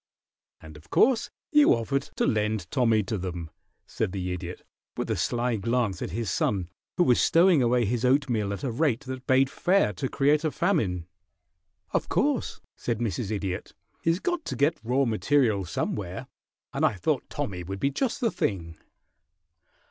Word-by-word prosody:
"And 80 -1 -12
of 75 - -18
course 245 -2 +3 0.2
you 295 - +6
offered 135 +5 -2
to - - +1
lend 105 -4 0
Tommy 115 -4 +3
to 100 +1 -3
them?" 85 -3 -5 0.3
said 90 - -3
the 90 -2 -2
Idiot, 90 0 -7 0.3
with - - -2
a - - +1
sly 120 -1 0
glance 115 -3 0
at - - -3
his 115 -5 -3
son, 95 -3 0 0.3
who 180 - +5
was 125 -7 +4
stowing 170 -3 +5
away 120 0 +3
his 120 +3 -1
oatmeal 125 -6 +2
at 100 - -5
a 130 - -1
rate 130 -1 +1
that 130 -2 -7
bade 130 +1 +4
fair 180 - +2
to 130 +9 -3
create 145 +2 +2
a 155 - +2
famine. 115 - 0 0.9
"Of - - -1
course," - - 0
said 120 -2 -2
Mrs. 110 -2 -2
Idiot. 100 -4 -4 0.3
"He's 165 +2 +1
got 350 - -2
to - - -3
get 145 +6 +1
raw 130 +4 +2
material 115 -3 +2
somewhere, 85 - -3 0.5
and - - -1
I - - +4
thought 90 - -1
Tommy 90 -3 -4
would 95 +3 -6
be 140 - +1
just 245 - -1
the 230 -3 +2
thing." 85 -5 -2
115 Hz, 170 wpm, -27 LUFS, 95-140 Hz, 0.9 s, you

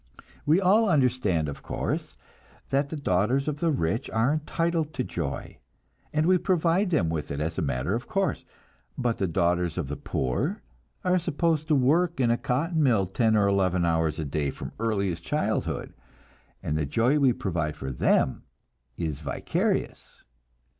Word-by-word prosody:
We 160 +5 +5
all 205 +3 +4
understand, 125 - +2
of 70 - -6
course, - - -3 0.5
that 140 +1 +1
the 160 - -4
daughters 130 +2 +1
of 150 -1 -2
the 170 - +1
rich 115 - -1
are 115 +6 +2
entitled 160 0 -1
to 130 - 0
joy, 80 - -5 0.5
and 155 +1 +1
we 185 +1 +4
provide 180 +1 +2
them 95 - +2
with 80 -2 -3
it 70 - -3
as 80 +4 -2
a - - 0
matter 70 +3 -1
of 120 +3 -3
course; 195 -2 -1 0.5
but 120 -2 -1
the 95 - +1
daughters 85 0 0
of 80 -7 -2
the 75 - -3
poor 65 -3 -2 0.4
are 180 0 +3
supposed 165 -2 0
to 155 - +3
work 155 +5 +2
in 120 -3 +3
a - - +4
cotton 160 +6 0
mill 115 -9 +3
ten 110 +4 +2
or 100 -1 +3
eleven 95 -3 +2
hours 80 -2 +1
a 80 - -3
day 70 0 -1
from - - -7
earliest 100 -7 -1
childhood, - - -2 0.7
and 75 - -1
the 75 -2 0
joy 120 - +2
we 135 -3 +5
provide 85 -9 -2
for 65 - -5
them 65 +1 +2 0.6
is 80 -5 -3
vicarious. 70 -2 -2
115 Hz, 165 wpm, -27 LUFS, -, 0.7 s, We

